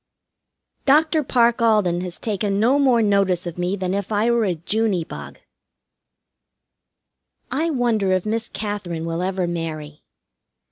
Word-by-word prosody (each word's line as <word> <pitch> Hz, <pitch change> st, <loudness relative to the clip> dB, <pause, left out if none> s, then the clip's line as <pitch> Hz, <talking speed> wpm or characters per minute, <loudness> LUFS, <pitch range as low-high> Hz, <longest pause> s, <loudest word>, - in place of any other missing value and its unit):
Dr. 310 Hz, +2 st, +4 dB
Parke 235 Hz, -3 st, +2 dB
Alden 210 Hz, -6 st, +2 dB
has 180 Hz, -1 st, -5 dB
taken 205 Hz, -2 st, -1 dB
no 250 Hz, +6 st, +3 dB
more 250 Hz, -5 st, +4 dB
notice 195 Hz, -3 st, +2 dB
of 175 Hz, 0 st, -6 dB
me 180 Hz, +2 st, 0 dB
than 185 Hz, -1 st, -2 dB
if 200 Hz, +1 st, -3 dB
I 215 Hz, +3 st, +2 dB
were 235 Hz, -2 st, +2 dB
a 180 Hz, -3 st, 0 dB
Juney 195 Hz, +2 st, 0 dB
bug. -, -, -9 dB, 2.1 s
I 315 Hz, +5 st, 0 dB
wonder 235 Hz, -9 st, +1 dB
if 185 Hz, 0 st, +1 dB
Miss 225 Hz, +1 st, -2 dB
Katherine 200 Hz, -6 st, -4 dB
will 165 Hz, +1 st, -3 dB
ever 185 Hz, 0 st, -1 dB
marry. 155 Hz, -3 st, -5 dB
200 Hz, 140 wpm, -22 LUFS, 180-230 Hz, 2.1 s, Dr